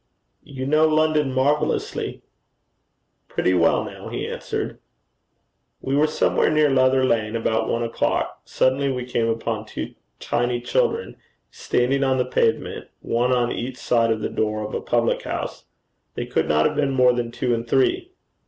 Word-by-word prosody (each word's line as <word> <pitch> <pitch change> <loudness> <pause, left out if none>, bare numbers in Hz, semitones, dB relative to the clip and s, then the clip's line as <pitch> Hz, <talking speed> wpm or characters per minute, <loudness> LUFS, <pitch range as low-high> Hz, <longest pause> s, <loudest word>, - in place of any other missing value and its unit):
'You 130 -2 -7
know 155 +3 +4
London 155 -2 +2
marvellously.' 140 +3 -1 1.0
'Pretty 95 - 0
well 90 - +3
now,' - - -8
he - - -4
answered. - - -4 1.0
We 135 - -2
were 150 +2 +4
somewhere 155 - +2
near 150 -2 +3
Leather 130 0 +3
Lane 110 -3 0
about 115 0 0
one 115 - 0
o'clock. 115 - -1
Suddenly 135 +1 +1
we 125 -1 -3
came 120 -2 0
upon 115 -1 -2
two - - -6 0.3
tiny 120 0 -1
children 470 - -1 0.3
standing 135 +3 0
on 130 -1 +2
the 125 - +1
pavement, 465 -2 0
one 120 +2 0
on 120 -1 +2
each 125 +1 -4
side 115 -1 +2
of 110 -1 0
the - - -2
door 110 0 -1
of 105 - -7
a - - -2
public - - +1
house. - - -5 0.5
They - - -3
could - - -1
not 75 0 +3
have - - +1
been 140 -2 +1
more 125 -2 +4
than 120 -1 -2
two 120 +1 -1
and 115 0 -2
three. 350 - +1
125 Hz, 160 wpm, -23 LUFS, 115-140 Hz, 1.0 s, know